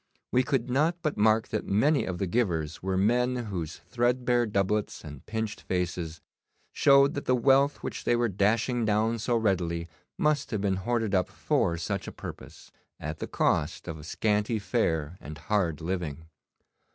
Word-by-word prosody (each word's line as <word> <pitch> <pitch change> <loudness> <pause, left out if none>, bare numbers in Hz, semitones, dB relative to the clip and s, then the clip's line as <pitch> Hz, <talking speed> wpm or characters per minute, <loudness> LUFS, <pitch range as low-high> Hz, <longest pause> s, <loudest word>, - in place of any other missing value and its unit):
We 125 - +4
could 130 -2 0
not 155 +7 +1
but 155 - 0
mark 110 +1 +3
that 110 - -3
many 135 +9 +3
of 90 -2 -3
the 95 - -1
givers 85 -7 -1
were 95 0 -1
men 125 +5 +2
whose 95 -9 -4
threadbare 120 0 +1
doublets 105 +1 -1
and 75 -3 -9
pinched 110 -1 -3
faces 85 -2 -3 0.5
showed 140 0 +5
that 145 - -4
the 130 - +3
wealth 135 +3 +3
which - - -5
they 120 - +2
were 120 0 +2
dashing 110 +5 +1
down 110 +2 +1
so 120 +2 +1
readily 85 -6 0 0.3
must 150 -1 +1
have 105 -4 -2
been 95 -2 +1
hoarded 115 +1 -1
up 95 -2 +2
for 85 -1 0
such 85 - -3
a - - -5
purpose, - - -10 0.3
at 80 +1 -5
the - - -4
cost 75 +4 0
of 80 -3 -6
scanty 105 +4 0
fare 90 - -1
and 75 +1 -8
hard 85 -3 0
living. 80 -3 -3
105 Hz, 165 wpm, -28 LUFS, 90-120 Hz, 0.5 s, showed